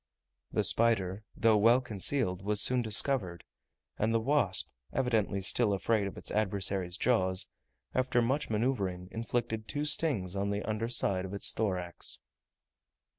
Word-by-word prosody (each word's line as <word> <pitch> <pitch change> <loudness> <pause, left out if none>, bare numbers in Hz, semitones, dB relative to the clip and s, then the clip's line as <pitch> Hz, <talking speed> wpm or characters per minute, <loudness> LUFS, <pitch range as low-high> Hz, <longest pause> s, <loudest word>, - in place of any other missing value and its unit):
The - - +1
spider, 105 -3 +1
though 110 -2 +4
well 115 +4 +5
concealed, 110 -4 -1
was 105 +1 0
soon 125 +2 +3
discovered, 110 - +2 0.6
and 110 +2 +1
the 115 - +2
wasp, 115 -6 +1 0.2
evidently 110 -7 0
still 105 +1 +2
afraid 100 +1 +1
of 100 - -8
its - - -4
adversary's 95 -3 0
jaws, 95 -6 +1 0.5
after 130 -1 +1
much 130 +5 0
manoeuvring, 100 -6 -1
inflicted 115 -1 -3
two 145 0 -2
stings 135 - 0
on 100 +1 -1
the 100 0 -2
under 110 +2 -2
side 95 -6 0
of 95 +1 -6
its 100 - 0
thorax. 90 -5 -3
110 Hz, 140 wpm, -31 LUFS, 95-120 Hz, 0.6 s, well